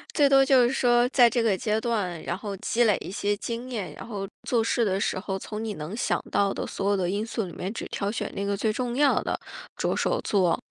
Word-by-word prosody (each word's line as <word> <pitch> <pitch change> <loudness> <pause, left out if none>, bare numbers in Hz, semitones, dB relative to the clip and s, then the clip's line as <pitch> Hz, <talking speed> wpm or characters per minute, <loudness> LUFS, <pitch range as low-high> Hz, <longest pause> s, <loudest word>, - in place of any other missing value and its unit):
最 290 -2 +5
多 270 0 +6
就 265 -2 +5
是 240 - +2
说 240 -2 +3
在 245 -3 +6
这 235 -1 0
个 210 -4 +2
阶 220 -2 0
段， 205 -8 -2
然 - - -3
后 200 0 -5
积 235 +5 +1
累 210 -3 +4
一 - - -6
些 205 +1 0
经 235 +4 -5
验， 210 -7 -4
然 - - -10
后 205 -4 -4 0.2
做 235 -3 +1
事 230 +1 +1
的 190 -2 +1
时 185 - 0
候， 195 0 -3
从 210 +2 -6
你 220 -1 -3
能 155 +1 -6
想 245 - 0
到 200 -1 +2
的 - - -4
所 200 +1 -1
有 - - +3
的 180 -3 0
因 205 +3 -1
素 225 0 -2
里 180 - -7
面， 180 +4 -5
只 - - -5
挑 200 - -2
选 215 - -3
那 200 - -3
个 200 0 0
最 215 +2 0
重 240 +2 -2
要 285 +1 +3
的， - - -2 0.4
着 - - 0
手 - - +1
做。 185 -5 +2
215 Hz, 280 characters per minute, -26 LUFS, 195-240 Hz, 0.4 s, 多